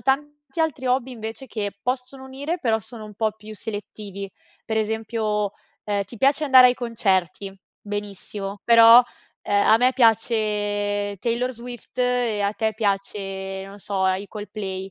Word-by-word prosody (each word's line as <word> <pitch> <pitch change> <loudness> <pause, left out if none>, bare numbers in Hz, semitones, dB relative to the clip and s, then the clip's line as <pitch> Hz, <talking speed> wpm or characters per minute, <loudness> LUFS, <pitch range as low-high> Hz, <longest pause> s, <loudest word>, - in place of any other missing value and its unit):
tanti 295 +2 -2
altri 290 -5 -1
hobby, 255 +1 +1
invece, 225 +2 -7
che 205 -3 -3
possono 255 +1 -3
unire 285 +6 -4
però 225 -3 +2
sono 220 +1 -10
un 210 -1 -11
po' 215 0 0
più 215 0 -12
selettivi. 205 -1 -7 0.3
Per 220 - -2
esempio, 215 -1 -1 0.3
ehm, 205 -1 -1
ti 235 - -12
piace 275 +6 +2
andare 260 -3 +8
ai 245 - +2
concerti. 195 -5 -1 0.3
Benissimo, 205 -1 -6
però, 230 +1 +8 0.4
ehm, 200 0 +2
a 220 - +7
me 255 +1 +4
piace 205 -3 +1
Taylor 240 +3 -1
Swift 240 0 -10
e 245 -4 +1
a 200 - +1
te 220 0 -1
piace, 195 -2 -2
non 200 +1 -11
so, 200 -1 -3
uhm, 190 0 +3
i 205 - -9
Coldplay. 195 -3 -6
220 Hz, 155 wpm, -23 LUFS, 205-250 Hz, 0.4 s, andare